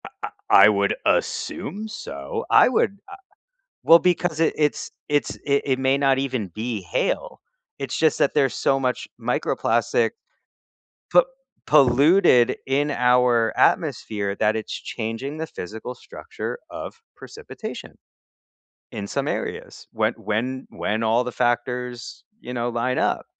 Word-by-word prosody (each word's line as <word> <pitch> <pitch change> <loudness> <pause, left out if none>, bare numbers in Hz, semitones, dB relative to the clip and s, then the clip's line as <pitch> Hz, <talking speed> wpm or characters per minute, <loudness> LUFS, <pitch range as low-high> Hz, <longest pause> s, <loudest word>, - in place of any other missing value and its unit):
I - - -8
I 95 - +4
I - - +7
would 100 -1 +1
assume 210 +8 -1
so. 70 - -6
I - - +6
would, 205 -5 +1
uh - - -8 0.7
well, 165 - +8
because 175 -2 0
it 165 - +2
it's 150 0 0 0.2
it's 145 -1 0
it 140 -1 +1
it 130 -2 0
may 130 +1 +2
not 135 -1 +3
even 130 -7 -2
be 110 +3 -4
hail. 90 - -2 0.4
It's 135 -2 -4
just 160 -2 +2
that - - +2
there's 135 -2 +2
so 135 - +1
much 130 -1 -1
microplastic - - 0 1.0
po - - +7 0.4
polluted 130 -1 +5
in 145 +2 +1
our 125 -3 +3
atmosphere 100 -2 +1
that 110 0 +2
it's 110 - -4
changing 120 +6 -5
the 160 +1 -4
physical 110 - -7
structure 480 +1 -7
of - - -7 0.2
precipitation 460 +1 -9 0.9
in 105 -5 -5
some - - -2
areas - - -5
when - - 0
when 125 +5 -3
when 110 +2 -2
all 115 +2 +2
the 125 - -5
factors, 120 0 -2 0.2
you 125 - -7
know, 120 0 -1
line 120 +2 -1
up. - - 0
125 Hz, 140 wpm, -23 LUFS, 115-145 Hz, 1.0 s, well